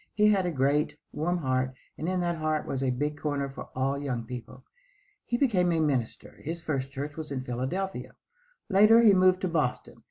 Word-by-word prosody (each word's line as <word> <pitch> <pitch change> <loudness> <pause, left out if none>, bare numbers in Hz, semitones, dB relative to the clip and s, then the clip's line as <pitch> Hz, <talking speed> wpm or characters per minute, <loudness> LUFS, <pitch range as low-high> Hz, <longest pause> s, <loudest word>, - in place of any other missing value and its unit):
He 210 0 +5
had 195 -3 +2
a - - 0
great, 145 +1 +1
warm 175 +4 -1
heart, 130 -4 -1 0.2
and 160 - -3
in 185 -1 0
that 175 -1 -1
heart 155 -1 -1
was 135 - -3
a 135 - +1
big 145 +4 -2
corner 145 -2 -1
for 135 - -9
all 135 +2 0
young 130 -5 -3
people. 125 +2 -8 0.6
He 240 - 0
became 195 -10 +2
a 165 - +1
minister. 135 -7 -1
His 165 +3 -4
first 135 -5 -2
church 145 +2 -5
was 155 -2 -7
in 130 -2 -3
Philadelphia. 130 +11 -3 0.5
Later 215 +3 +6
he 215 -3 +7
moved 185 0 +4
to 185 - 0
Boston. 155 -7 -1
150 Hz, 195 wpm, -28 LUFS, 135-180 Hz, 0.6 s, he